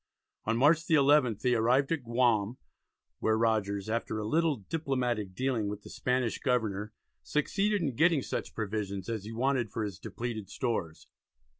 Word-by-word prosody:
On 115 Hz, +1 st, +1 dB
March 155 Hz, +6 st, +4 dB
the 160 Hz, -, +4 dB
11th 140 Hz, -7 st, +4 dB
they 125 Hz, -, +3 dB
arrived 125 Hz, +5 st, +3 dB
at 160 Hz, -5 st, 0 dB
Guam, 115 Hz, -2 st, +1 dB, 0.6 s
where 110 Hz, 0 st, +2 dB
Rogers 105 Hz, -3 st, 0 dB
after 110 Hz, 0 st, -2 dB
a 105 Hz, -, -3 dB
little 160 Hz, +5 st, +2 dB
diplomatic 120 Hz, -, -2 dB
dealing 125 Hz, -4 st, 0 dB
with 105 Hz, 0 st, -6 dB
the -, -, -11 dB
Spanish 125 Hz, -3 st, 0 dB
governor 110 Hz, -5 st, 0 dB, 0.3 s
succeeded 195 Hz, -, 0 dB
in 140 Hz, -6 st, -1 dB
getting 160 Hz, -1 st, +3 dB
such -, -, -4 dB
provisions 100 Hz, -3 st, -3 dB
as 110 Hz, -3 st, -3 dB
he 110 Hz, -, -6 dB
wanted 125 Hz, 0 st, 0 dB
for 110 Hz, -, -3 dB
his 100 Hz, -3 st, -5 dB
depleted 110 Hz, -3 st, -5 dB
stores. 105 Hz, -, -3 dB
115 Hz, 160 wpm, -30 LUFS, 105-135 Hz, 0.6 s, March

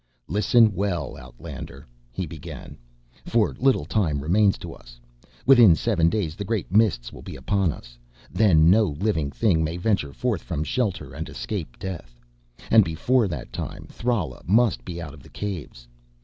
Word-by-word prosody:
"Listen 105 Hz, +4 st, +4 dB
well, 95 Hz, -2 st, -2 dB
outlander," 70 Hz, +3 st, -10 dB, 0.3 s
he 90 Hz, +9 st, -3 dB
began, 80 Hz, 0 st, -9 dB, 0.5 s
"for 115 Hz, -3 st, +1 dB
little 135 Hz, +1 st, +2 dB
time 80 Hz, -10 st, 0 dB
remains 95 Hz, +7 st, +3 dB
to -, -, -8 dB
us. -, -, -16 dB, 0.5 s
Within 120 Hz, -10 st, +7 dB
seven 80 Hz, +2 st, +2 dB
days 85 Hz, -5 st, -2 dB
the 100 Hz, -, -5 dB
Great 100 Hz, -3 st, -3 dB
Mists 100 Hz, -, +2 dB
will -, -, -10 dB
be -, -, -9 dB
upon 100 Hz, -5 st, 0 dB
us. -, -, -13 dB, 0.3 s
Then 90 Hz, -6 st, +4 dB
no 110 Hz, +2 st, +5 dB
living 90 Hz, -8 st, 0 dB
thing 85 Hz, 0 st, +1 dB
may 80 Hz, +2 st, -2 dB
venture 90 Hz, -6 st, 0 dB
forth 115 Hz, -, -2 dB
from 75 Hz, -4 st, -3 dB
shelter 100 Hz, -, -2 dB
and 80 Hz, +3 st, -6 dB
escape 75 Hz, -, -5 dB
death. 75 Hz, -11 st, -7 dB, 0.5 s
And 110 Hz, -1 st, +8 dB
before 105 Hz, +9 st, +1 dB
that 75 Hz, -9 st, -6 dB
time -, -, -6 dB
Thrala 105 Hz, -, -2 dB
must 105 Hz, -, +3 dB
be 85 Hz, +6 st, -6 dB
out 75 Hz, -4 st, -7 dB
of 75 Hz, -, -14 dB
the -, -, -16 dB
Caves. 85 Hz, -12 st, -6 dB
90 Hz, 165 wpm, -24 LUFS, 75-105 Hz, 0.5 s, And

